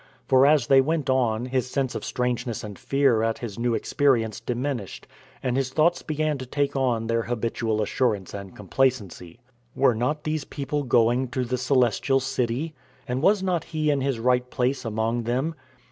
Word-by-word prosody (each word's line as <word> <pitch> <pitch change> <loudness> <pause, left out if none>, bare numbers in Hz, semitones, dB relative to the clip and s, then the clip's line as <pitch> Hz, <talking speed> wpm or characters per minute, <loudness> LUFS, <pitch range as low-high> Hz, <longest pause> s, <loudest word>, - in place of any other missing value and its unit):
For 130 +1 +5
as 145 -4 +4
they 135 0 +6
went 150 -1 0
on 120 -3 +1
his 130 -1 -1
sense 135 -1 -1
of - - -5
strangeness 125 -1 -2
and 105 -2 -8
fear 135 -5 +2
at 115 0 0
his 115 -3 -7
new 120 -1 +1
experience 115 -7 +1
diminished, 125 -4 -4 0.4
and 125 -1 0
his 135 -1 0
thoughts 160 +6 +2
began 155 -2 -1
to 130 - -5
take 145 +2 -1
on 125 -4 +1
their 115 0 +1
habitual 115 -2 -1
assurance 105 -4 -1
and 100 -2 -8
complacency. 105 -4 -1 0.4
Were 130 -2 +4
not 130 +7 -1
these 155 -1 -2
people 145 +2 -3
going 120 0 +2
to 125 +1 -2
the 125 +1 -1
Celestial 130 0 +2
City? 135 +3 -2 0.3
And 125 +1 -2
was 195 +3 +3
not 180 -4 0
he 155 -2 0
in 140 -2 0
his 135 -2 0
right 125 +2 +1
place 125 +2 -1
among 115 +1 -1
them? 130 +7 -1
125 Hz, 175 wpm, -25 LUFS, 115-140 Hz, 0.4 s, they